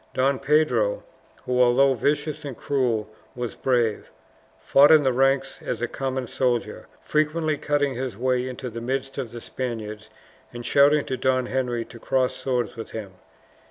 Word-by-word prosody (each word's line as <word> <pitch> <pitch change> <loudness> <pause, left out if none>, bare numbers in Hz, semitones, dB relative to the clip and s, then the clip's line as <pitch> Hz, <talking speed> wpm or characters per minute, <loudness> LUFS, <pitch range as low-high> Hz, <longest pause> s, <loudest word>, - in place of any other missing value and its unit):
Don 135 +1 +2
Pedro 155 - +2 0.4
who, 125 0 +1
although 130 +2 +5
vicious 145 +5 -1
and 140 -4 -6
cruel, 120 -6 0 0.3
was 120 -2 -4
brave 120 -5 0 0.5
fought 140 +2 +5
in 155 -2 +7
the 130 -2 +2
ranks 135 +1 +1
as 120 - -3
a 120 - -1
common 130 +1 -3
soldier, 120 0 -2
frequently 155 +1 0
cutting 145 -1 0
his 125 -4 -4
way 125 +1 0
into 125 -1 -6
the 115 +1 -6
midst 135 +3 -3
of 125 -5 -4
the 120 - -7
Spaniards, 110 -5 -5 0.4
and 120 0 -8
shouting 145 +1 +4
to 130 - -3
Don 130 0 +1
Henry 125 -2 -2
to 115 - -13
cross 130 +2 0
swords 125 -3 -2
with 115 -1 -7
him. 105 -4 -7
130 Hz, 160 wpm, -24 LUFS, 120-140 Hz, 0.5 s, in